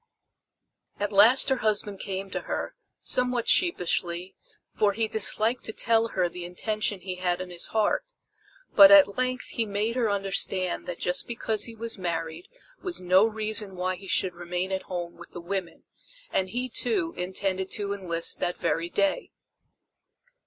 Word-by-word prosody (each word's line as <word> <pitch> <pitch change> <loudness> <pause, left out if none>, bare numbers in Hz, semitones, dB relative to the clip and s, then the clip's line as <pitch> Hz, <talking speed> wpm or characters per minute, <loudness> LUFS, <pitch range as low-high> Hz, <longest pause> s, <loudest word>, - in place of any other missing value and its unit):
At 205 0 -1
last 215 +8 +6
her 265 - +2
husband 205 -3 -1
came 195 -1 -4
to - - -2
her, - - -3 0.3
somewhat 250 -2 0
sheepishly, 180 - +1 0.4
for 205 -1 +2
he 225 +2 0
disliked 220 +3 +2
to 220 - -3
tell 225 0 +2
her 185 -5 0
the 175 0 -7
intention 205 +3 -3
he 185 0 -5
had 180 -1 0
in 185 -1 -6
his 175 - -1
heart; 220 -2 +1 0.7
but 295 - +10
at 295 -9 +7
length 255 0 -1
he 230 -2 -2
made 210 +3 -1
her 240 -4 +1
understand 195 -2 -1
that 175 -1 -4
just 180 0 -2
because 225 -2 -1
he 230 - -8
was 225 -2 -5
married 165 -1 -4 0.3
was 365 -3 -4
no 185 +4 +4
reason 215 -2 -2
why 185 +1 -1
he 195 +2 -12
should 185 -1 +1
remain 175 +2 -4
at 190 0 -1
home 175 -2 -5
with - - -13
the - - -6
women; 180 0 -5 0.5
and 190 0 0
he, 250 +5 -2
too, 340 - -1
intended 190 +1 -2
to 200 -2 -2
enlist 170 -4 -1
that 175 - -1
very 170 +1 -1
day. 295 - 0
200 Hz, 165 wpm, -27 LUFS, 180-225 Hz, 0.7 s, but